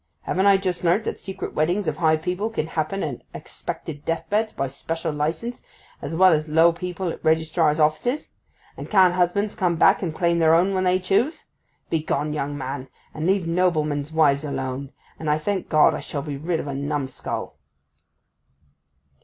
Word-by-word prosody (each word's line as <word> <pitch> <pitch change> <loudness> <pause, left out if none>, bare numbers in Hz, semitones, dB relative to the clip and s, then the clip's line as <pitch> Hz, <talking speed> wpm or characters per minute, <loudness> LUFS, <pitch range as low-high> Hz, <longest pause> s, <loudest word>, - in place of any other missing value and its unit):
Haven't 190 +2 +1
I 200 -1 +7
just 185 -3 -3
learnt 180 +5 +3
that - - -4
secret 190 - -6
weddings 175 +5 0
of 155 -1 -1
high 160 -1 +3
people 180 +7 -2
can 225 -8 -2
happen 160 +4 -2
at 140 -5 -4
expected 145 -2 -7
deathbeds 210 +7 -1
by 135 - -2
special 160 +5 -4
licence, 165 +12 -3 0.4
as 145 +3 -4
well 185 +2 +6
as 155 0 0
low 165 +2 +5
people 180 +1 -4
at - - -7
registrars' 160 -1 +2
offices? 155 - +1 0.5
And - - -7
can't 190 -4 +5
husbands 185 +4 +1
come 180 -3 0
back 165 - +4
and 175 -4 -1
claim 170 +1 +1
their 160 0 +5
own 185 +4 +3
when 185 -1 0
they 180 0 +4
choose? 195 - 0 0.5
Begone, 150 -2 -1
young 145 -1 -3
man, 130 -1 -5 0.3
and 155 +2 -3
leave 190 -2 +2
noblemen's 155 -4 0
wives 150 -3 +3
alone; 135 -1 -4 0.3
and 155 - -3
I 150 - +3
thank 190 +4 -2
God 155 0 +5
I 150 - -3
shall 145 0 -5
be 145 -2 -4
rid 160 +4 -2
of - - -4
a 140 - -4
numskull! 140 -1 -4
160 Hz, 180 wpm, -23 LUFS, 150-185 Hz, 0.5 s, I